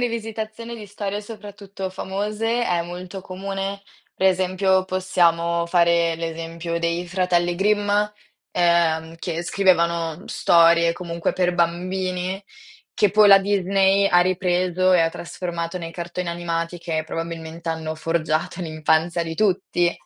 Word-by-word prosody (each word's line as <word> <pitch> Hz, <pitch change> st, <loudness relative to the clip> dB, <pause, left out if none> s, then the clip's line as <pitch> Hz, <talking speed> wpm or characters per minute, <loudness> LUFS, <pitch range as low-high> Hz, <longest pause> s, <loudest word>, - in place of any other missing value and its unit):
rivisitazione 230 Hz, 0 st, -4 dB
di 210 Hz, -2 st, -9 dB
storie 205 Hz, 0 st, -4 dB
soprattutto 200 Hz, -3 st, -8 dB
famose 210 Hz, +5 st, -2 dB
è 175 Hz, -1 st, +1 dB
molto 180 Hz, +2 st, -7 dB
comune, 195 Hz, +1 st, -5 dB, 0.3 s
per 190 Hz, -, +3 dB
esempio 185 Hz, 0 st, +2 dB
possiamo 170 Hz, -2 st, +1 dB
fare 170 Hz, -1 st, +3 dB
l'esempio 165 Hz, +1 st, -4 dB
dei 170 Hz, +1 st, -2 dB
fratelli 175 Hz, -1 st, +1 dB
Grimm, 205 Hz, +1 st, +1 dB, 0.6 s
ehm, 165 Hz, -2 st, +2 dB
che 170 Hz, -1 st, -3 dB
scrivevano 170 Hz, -3 st, +1 dB
storie 170 Hz, 0 st, +4 dB
comunque 170 Hz, -1 st, -3 dB
per 180 Hz, -1 st, 0 dB
bambini, 185 Hz, +2 st, -1 dB, 0.5 s
che 205 Hz, -, +3 dB
poi 210 Hz, 0 st, +6 dB
la 195 Hz, -1 st, +9 dB
Disney 195 Hz, 0 st, +2 dB
ha 175 Hz, -2 st, +5 dB
ripreso 185 Hz, 0 st, +1 dB
e 180 Hz, -, +5 dB
ha 165 Hz, -, +3 dB
trasformato 170 Hz, 0 st, -5 dB
nei 165 Hz, -2 st, -5 dB
cartoni 175 Hz, +1 st, -5 dB
animati 170 Hz, 0 st, -3 dB
che 160 Hz, -2 st, -2 dB
probabilmente 165 Hz, 0 st, -6 dB
hanno 160 Hz, -1 st, -3 dB
forgiato 160 Hz, +1 st, -1 dB
l'infanzia 160 Hz, +1 st, 0 dB
di 165 Hz, 0 st, -5 dB
tutti. 175 Hz, -3 st, +1 dB
175 Hz, 125 wpm, -22 LUFS, 170-195 Hz, 0.6 s, la